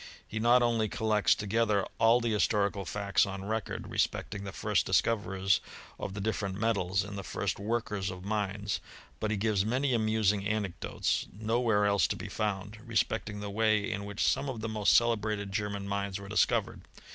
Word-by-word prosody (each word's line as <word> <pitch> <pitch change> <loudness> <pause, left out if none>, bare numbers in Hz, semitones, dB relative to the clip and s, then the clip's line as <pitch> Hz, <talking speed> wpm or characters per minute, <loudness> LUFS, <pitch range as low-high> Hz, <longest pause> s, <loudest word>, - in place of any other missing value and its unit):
He 110 - -4
not 120 +2 +5
only 115 -3 +1
collects 110 -1 +2
toge« 110 +3 0
ther 100 -2 +2
all 115 +2 +5
the 120 -1 -1
historical 100 -2 +1
facts 100 +1 +1
on 95 0 -5
record, 110 +1 -3
respecting 100 0 -1
the 100 - -5
first 105 +1 +1
discoverers 95 -2 +2 0.4
of 95 - -5
the - - -4
different 100 -2 -2
metals 100 -3 +1
and 100 0 -6
the - - -6
first - - -2
workers 105 -2 -2
of 90 0 -8
mines, 100 -1 -1 0.4
but 110 - -1
he 105 - 0
gives 105 -1 +1
many 130 +5 +1
amusing 110 -3 +2
anec 105 -2 -1
dotes - - -1
nowhere 110 0 +1
else 100 -1 +3
to - - -2
be - - -7
found, 105 0 -3
respecting 110 -3 -1
the 100 -1 -5
way 110 -1 +2
in 100 - -3
which 100 0 -2
some 140 - +1
of 120 -4 -5
the 115 - -2
most 110 -2 +2
celebrated 105 -3 +2
German 100 0 -2
mines 100 -1 -2
were 100 - -9
discovered. 105 - +1
105 Hz, 180 wpm, -30 LUFS, 100-110 Hz, 0.4 s, not